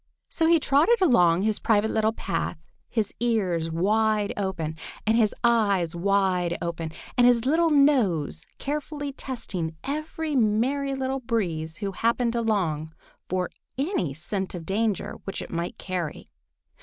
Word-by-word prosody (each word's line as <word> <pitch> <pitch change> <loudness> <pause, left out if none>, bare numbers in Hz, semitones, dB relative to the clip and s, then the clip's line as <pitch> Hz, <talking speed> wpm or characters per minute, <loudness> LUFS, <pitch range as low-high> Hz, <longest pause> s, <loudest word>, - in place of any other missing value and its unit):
So 325 - +1
he 335 0 +5
trotted 300 +12 +4
along 190 - +4
his 215 -1 +1
private 220 0 +2
little 220 0 +2
path, - - -3 0.3
his 220 -4 -1
ears 190 -9 0
wide 210 +5 +1
open, 180 -6 -2 0.3
and 220 +1 +3
his 220 -3 +4
eyes 200 -8 +2
wide 180 -2 +1
open, 165 -2 -4 0.3
and 245 - +7
his 240 -1 +4
little 325 +4 +3
nose 230 - +2
carefully 290 0 -4
testing 200 - -4
every 310 +2 -3
Merry 260 +5 +1
Little 265 0 -2
Breeze 170 -10 -2
who 200 -2 -3
happened 230 +4 +1
along 175 -9 -1 0.3
for 185 0 -1 0.3
any 275 - 0
scent 190 +4 -3
of 170 -2 -7
danger 210 +2 -1
which 195 - -4
it - - -7
might 170 +6 -3
carry. 180 -5 -4
215 Hz, 140 wpm, -26 LUFS, 175-260 Hz, 0.3 s, and